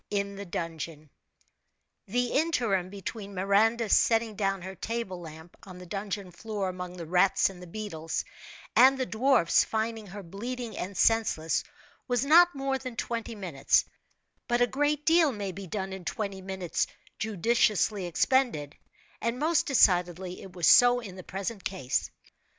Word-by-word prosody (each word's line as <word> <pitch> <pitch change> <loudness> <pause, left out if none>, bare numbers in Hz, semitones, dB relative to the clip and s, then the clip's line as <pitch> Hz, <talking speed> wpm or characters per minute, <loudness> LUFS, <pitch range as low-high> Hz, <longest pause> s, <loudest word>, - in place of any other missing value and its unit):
IN 200 -1 -2
THE 200 +1 -7
DUNGEON. 160 -3 -5 1.0
The 245 +4 0
interim 235 - +1
between 200 +1 -7
Miranda 215 +5 +2
setting 225 +1 +3
down 195 -2 -1
her 190 +1 -7 0.3
lamp 170 -2 -10
on 185 -2 -11
the 180 - -10
dungeon 195 0 -5
floor 200 +1 -4
among 180 0 -7
the 170 - -6
rats 180 +3 +3
and 180 -2 -13
the 180 - -10
beetles, 165 -5 -4 0.5
and 265 +2 +7
the 260 - -1
dwarf's 240 -7 +3
finding 220 -1 -3
her 200 +2 -8
bleeding 235 +6 -6
and 190 +2 -5
senseless, 220 -8 +2 0.4
was 245 0 +1
not 345 +3 +6
more 270 -1 -1
than 255 -2 -7
twenty 230 -1 -4
minutes, 175 -9 +1 0.6
but 240 0 +1
a 245 - +5
great 290 +4 0
deal 325 -2 +5
may 205 -4 -4
be 195 +1 -8
done 190 +1 -4
in 190 -1 -7
twenty 200 0 -4
minutes 190 -2 -2 0.3
judiciously 215 -2 +1
expended, 175 - +1 0.5
and 230 +2 -1
most 315 +3 +1
decidedly 180 - +2
it 190 - -11
was 175 -3 0
so 245 +8 +7
in 200 -6 -9
the 185 - -8
present 195 +3 -5
case. 180 -10 -2
200 Hz, 150 wpm, -28 LUFS, 180-235 Hz, 1.0 s, and